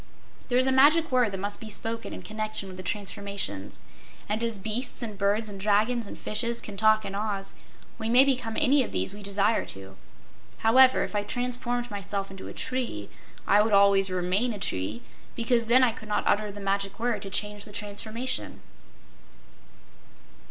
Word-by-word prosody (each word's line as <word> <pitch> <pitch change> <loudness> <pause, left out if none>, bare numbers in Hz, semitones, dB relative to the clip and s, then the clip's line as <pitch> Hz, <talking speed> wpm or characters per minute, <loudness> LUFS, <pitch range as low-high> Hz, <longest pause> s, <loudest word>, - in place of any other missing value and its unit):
There's 250 +1 +3
a 265 - +3
magic 295 +4 +5
word 250 -4 +3
that 195 - -4
must 205 +2 -2
be 220 - -7
spoken 225 +2 -3
in - - -7
connection 215 -2 -3
with 185 - -9
the 185 - -7
transformations, 195 - -4 0.5
and 215 +2 -1
as 230 -2 -2
beasts 220 +6 -2
and 215 -3 -5
birds 205 +3 +1
and 200 -2 -7
dragons 215 +3 +2
and - - -9
fishes 235 +2 -2
can 205 - -8
talk 215 +1 +3
in 195 - -5
Oz, 200 -1 -3 0.5
we 220 0 -2
may 250 +3 +7
become 250 -5 -1
any 285 -1 +4
of 250 - -3
these 190 - 0
we 205 - -9
desire 200 +2 +1
to. 95 0 -6 0.6
However, 255 +3 +5
if - - -5
I 205 - +2
transformed 245 +2 -2
myself 200 -1 -4
into 190 -1 -9
a - - -7
tree, 245 - -4 0.3
I 205 +1 +5
would 215 0 +1
always 200 -1 +5
remain 185 +6 0
a - - -6
tree, 105 - -2 0.3
because 235 -1 +1
then 255 +3 +6
I 250 - +4
could 215 -2 -11
not 210 - 0
utter 210 0 +1
the 205 - -9
magic 195 +1 -2
word 240 0 0
to 195 - -6
change 205 +1 -3
the 210 - -12
transformation." 215 +5 -5
210 Hz, 180 wpm, -27 LUFS, 200-235 Hz, 0.6 s, may